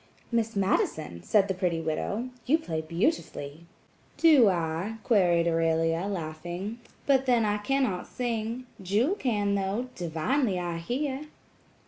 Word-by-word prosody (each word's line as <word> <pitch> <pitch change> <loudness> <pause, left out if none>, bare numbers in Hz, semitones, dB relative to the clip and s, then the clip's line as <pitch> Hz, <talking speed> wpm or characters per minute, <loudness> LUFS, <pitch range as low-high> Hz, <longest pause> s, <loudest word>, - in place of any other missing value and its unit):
"Miss 230 -1 0
Madison," 155 - 0
said 200 - +3
the 190 - 0
pretty 180 -3 0
widow, 165 +9 -2 0.2
"you 305 +5 +5
play 160 - -3
beautifully." 165 - -2 0.5
"Do 295 -10 +7
I?" 170 +4 -1
gueried 175 -7 +3
Aurelia, 165 +1 +1
laughing, 175 +4 -5 0.3
"but 270 -1 +3
then 240 -3 +4
I 210 0 +1
cannot 225 -5 0
sing, 235 0 -3 0.2
Jewel 210 - +2
can, 210 - 0
though–divinely, 200 - -1
I 175 -1 -2
hear." 265 - -2
200 Hz, 120 wpm, -28 LUFS, 170-245 Hz, 0.5 s, Do